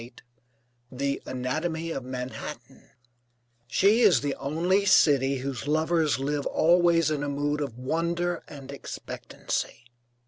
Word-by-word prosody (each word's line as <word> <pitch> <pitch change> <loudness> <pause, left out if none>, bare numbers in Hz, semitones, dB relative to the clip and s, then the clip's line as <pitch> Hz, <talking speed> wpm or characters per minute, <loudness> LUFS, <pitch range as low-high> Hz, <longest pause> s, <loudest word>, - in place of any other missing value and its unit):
NEW 115 - -9
YORK 120 - -18 0.7
THE 140 +2 -2
ANATOMY 160 +6 -2
OF 135 - -4
MANHATTAN 125 0 -7 0.8
She 200 - +4
is 185 - +5
the 145 -1 -1
only 170 +9 0
city 140 -8 +4
whose 135 0 -4
lovers 155 0 +2
live 145 +1 -2
always 170 -1 +3
in 150 -2 -1
a 145 - -2
mood 145 +1 -1
of 135 -5 -4
wonder 170 +6 -1
and 140 -2 -10
expectancy. 135 -3 -5
145 Hz, 130 wpm, -27 LUFS, 135-165 Hz, 0.8 s, is